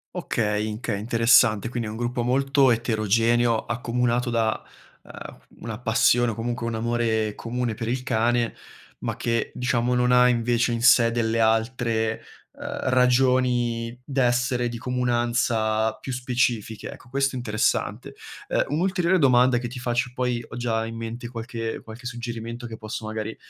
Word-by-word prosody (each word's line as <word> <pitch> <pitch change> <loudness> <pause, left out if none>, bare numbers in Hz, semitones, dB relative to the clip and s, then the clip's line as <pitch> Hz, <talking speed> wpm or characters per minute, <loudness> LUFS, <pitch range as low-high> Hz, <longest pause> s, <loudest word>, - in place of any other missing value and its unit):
Okay, 105 -1 -1
inche 110 +1 -4
interessante, 115 0 +3
quindi 120 -2 -3
è - - -5
un - - -7
gruppo 120 +1 -2
molto 135 +2 +3
eterogeneo, 115 0 +2
accomunato 120 +1 -1
da, 115 -2 0 0.4
uhm, - - -11 0.2
una 110 -1 -6
passione 120 0 +3
o - - -6
comunque 120 +1 -3
un 115 - -2
amore 110 -2 0
comune 120 0 -3
per 115 +1 -5
il 125 +1 -2
cane 120 -1 +1 0.5
ma - - -2
che, 115 -1 -1
diciamo, 125 0 0
non 125 0 +2
ha 125 0 +6
invece 120 0 +1
in 115 - -2
sé 115 -2 +6
delle 115 -1 0
altre, 115 0 +1 0.3
uhm, - - -5
ragioni 125 -2 +2
d'essere 125 -2 +1
di 120 0 -5
comunanza 120 -3 0
più 130 - -8
specifiche, 120 -3 -1
ecco, - - -14
questo 135 0 0
interessante. 110 -3 -1 0.4
Uhm, - - +2
un'ulteriore 180 +4 +1
domanda 125 -4 +4
che 120 -1 -5
ti 125 +1 -7
faccio, 125 +1 -1
e - - -22
poi 125 -2 -1
ho 120 - -9
già 115 -2 -1
in 115 0 -7
mente 115 +1 -6
qualche 115 -1 -5
qualche 115 +3 -12
suggerimento 120 -1 -6
che 115 - -7
posso 110 0 -6
magari, 110 0 -4
120 Hz, 155 wpm, -24 LUFS, 115-125 Hz, 0.5 s, ha